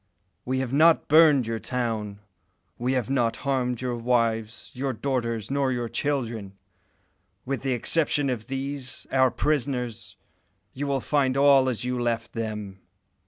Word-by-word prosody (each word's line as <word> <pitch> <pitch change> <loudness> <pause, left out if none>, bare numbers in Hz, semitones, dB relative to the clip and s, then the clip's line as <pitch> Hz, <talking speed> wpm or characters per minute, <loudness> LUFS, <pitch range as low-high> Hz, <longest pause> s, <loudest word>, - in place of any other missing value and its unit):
We 130 +1 -1
have 130 -1 -4
not 160 +3 +5
burned 150 -4 +6
your 115 0 -3
town; 110 -5 -3 0.6
we 125 +2 0
have 125 -4 0
not 120 -4 +1
harmed 125 -3 0
your 125 -1 -2
wives, 115 -2 -1
your 135 +1 -2
daughters, 115 -3 -2
nor 140 -1 +1
your 120 -2 -2
children. 115 -8 -2 0.9
With 135 -2 -2
the 135 -1 0
exception 145 +3 +1
of 120 -4 -3
these, 135 0 -4
our 130 -1 +4
prisoners, 125 -4 -2 0.6
you 145 +2 -4
will 135 -2 0
find 135 -2 +1
all 140 -2 +5
as 125 -1 -3
you 125 -1 -1
left 120 -1 -2
them." 105 -4 -5
125 Hz, 145 wpm, -26 LUFS, 115-135 Hz, 0.9 s, burned